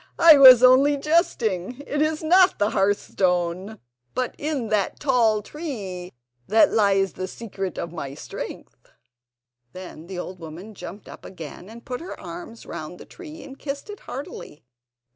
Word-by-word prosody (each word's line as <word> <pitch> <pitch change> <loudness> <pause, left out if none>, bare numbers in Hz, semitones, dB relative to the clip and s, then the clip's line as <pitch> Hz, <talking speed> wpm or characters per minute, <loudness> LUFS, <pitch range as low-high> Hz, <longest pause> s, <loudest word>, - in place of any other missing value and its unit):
I 330 -2 +9
was 255 -2 +10
only 270 +3 +6
jesting. 250 - 0
It 295 +1 -2
is 310 +1 0
not 365 +3 +5
in - - -32
the 205 +1 +1
hearthstone, 190 -1 0 0.4
but 255 -1 -1
in 285 -7 -2
that 210 -3 0
tall 230 -6 +2
tree 200 - -6 0.4
that 220 +1 +5
lies 195 -3 +2
the 185 - -5
secret 195 -3 -6
of 170 - -4
my 140 -5 -6
strength." - - -9 0.8
Then 180 -3 -10
the 190 -1 -7
old 180 +1 -6
woman 170 +6 -9
jumped 190 +2 -10
up - - -12
again 175 +1 -10
and 230 +1 -13
put 250 +2 -5
her 350 - -8
arms 335 -10 -9
round 170 +1 -7
the - - -12
tree, 325 -4 -11
and 275 -1 -12
kissed 285 +7 -6
it 415 - -10
heartily. 255 - -9
220 Hz, 160 wpm, -24 LUFS, 185-280 Hz, 0.8 s, was